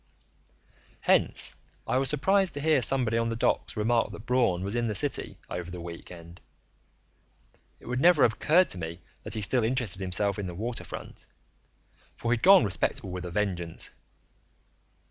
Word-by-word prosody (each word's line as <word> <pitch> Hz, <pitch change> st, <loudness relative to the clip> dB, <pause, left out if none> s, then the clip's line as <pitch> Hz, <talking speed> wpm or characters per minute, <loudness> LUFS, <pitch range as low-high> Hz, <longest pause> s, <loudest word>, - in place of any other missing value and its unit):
Hence -, -, +2 dB, 0.3 s
I -, -, 0 dB
was 135 Hz, -, +1 dB
surprised 190 Hz, +4 st, +2 dB
to -, -, -3 dB
hear 155 Hz, -2 st, +3 dB
somebody 120 Hz, -2 st, +2 dB
on 115 Hz, 0 st, 0 dB
the 115 Hz, -, -2 dB
docks 115 Hz, -, 0 dB
remark 115 Hz, +1 st, +1 dB
that 105 Hz, +2 st, -10 dB
Braun 120 Hz, -8 st, +1 dB
was 100 Hz, +4 st, -3 dB
in 120 Hz, 0 st, 0 dB
the 105 Hz, -, -2 dB
city -, -, -1 dB
over 90 Hz, -1 st, -5 dB
the 90 Hz, 0 st, -7 dB
week 85 Hz, 0 st, -9 dB
end. 85 Hz, 0 st, -12 dB, 1.4 s
It -, -, -18 dB
would 125 Hz, +2 st, -2 dB
never 175 Hz, -3 st, +6 dB
have 110 Hz, -, +4 dB
occurred 175 Hz, -, +3 dB
to 90 Hz, -, -6 dB
me 85 Hz, +1 st, -6 dB, 0.2 s
that -, -, -4 dB
he 110 Hz, -, -2 dB
still 120 Hz, +4 st, +2 dB
interested 115 Hz, -5 st, -1 dB
himself 95 Hz, +2 st, -1 dB
in 100 Hz, -, -3 dB
the 90 Hz, -, -6 dB
waterfront, 115 Hz, +5 st, -6 dB, 0.9 s
for 115 Hz, -, -2 dB
he'd 120 Hz, -1 st, +1 dB
gone 195 Hz, -, +7 dB
respectable 95 Hz, -1 st, -2 dB
with 90 Hz, 0 st, -5 dB
a 90 Hz, -, -6 dB
vengeance. 90 Hz, -4 st, -2 dB
110 Hz, 170 wpm, -28 LUFS, 90-125 Hz, 1.4 s, gone